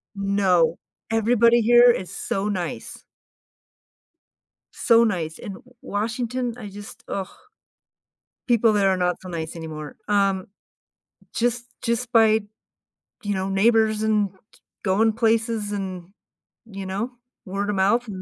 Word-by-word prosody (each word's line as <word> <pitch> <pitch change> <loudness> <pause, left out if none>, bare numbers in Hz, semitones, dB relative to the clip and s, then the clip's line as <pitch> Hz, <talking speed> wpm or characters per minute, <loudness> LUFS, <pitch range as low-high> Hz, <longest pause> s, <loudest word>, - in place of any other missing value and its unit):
No. 195 -4 +2 0.3
Everybody 235 +1 +4
here 240 +2 +7
is 185 -6 -4
so 200 +2 -2
nice. 180 -4 -5 1.7
So 230 0 +4
nice. 170 -8 -1
In 200 - -7
W - - -13 0.2
Washington, 235 +3 -2
I 220 - -8
just 205 +1 -11
ugh, 195 -1 -3 1.2
people 230 -2 +4
there 200 -2 +3
are 190 - +2
not 180 -1 0
so 185 - -10
nice 165 -1 -5
anymore. 155 -2 -7
Um, 195 -2 +1 0.9
just 240 0 0 0.2
just 235 +1 -1
by, 220 -1 +5
d 205 -1 -15 0.8
you 205 0 -1
know, 190 0 -2
neighbors 220 +2 +3
and 210 -2 +2 0.5
going 215 +3 +2
places 225 -1 0
and, 185 -3 -5 0.6
you 195 -3 -8
know, 205 +7 -3 0.3
word-of-mouth. 200 +4 0
205 Hz, 120 wpm, -23 LUFS, 190-230 Hz, 1.7 s, here